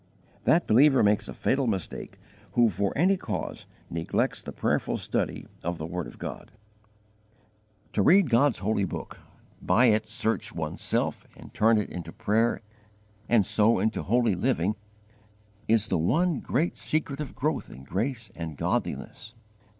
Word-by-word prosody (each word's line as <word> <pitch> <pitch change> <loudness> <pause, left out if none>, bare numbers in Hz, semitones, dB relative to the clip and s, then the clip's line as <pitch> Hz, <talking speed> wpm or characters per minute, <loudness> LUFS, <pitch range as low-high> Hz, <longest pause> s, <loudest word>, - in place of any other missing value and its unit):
That 170 - +4
believer 135 +3 +5
makes 105 0 +2
a - - -6
fatal 135 -1 +1
mistake 95 -7 -4 0.4
who 120 -2 +4
for 100 -1 -1
any 190 +5 +4
cause 105 - -5 0.2
neglects 85 0 -1
the - - -7
prayerful - - 0
study - - -2 0.2
of 85 0 -3
the 80 - -5
word 90 0 -4
of - - -12
God. - - -7 1.4
To - - +2
read 190 - +6
God's 125 +2 +3
holy 100 +2 0
book, 95 - -5 0.4
by 120 - +4
it 110 0 +1
search 115 0 -2
one's - - -4
self, - - -1
and - - -13
turn 110 +1 +4
it 105 - -2
into 85 -2 -6
prayer 115 +6 0 0.7
and 115 -4 +4
so 110 +4 +3
into 110 +4 0
holy 120 +1 +2
living, 100 0 0 0.9
is 110 -1 +3
the 90 - +1
one 160 - +2
great 155 +7 -1
secret 150 -2 -1
of 150 - -5
growth 150 +5 -1
in 65 - -11
grace 115 - -3
and 80 -3 -6
godliness. 115 - -3
110 Hz, 150 wpm, -27 LUFS, 95-130 Hz, 1.4 s, read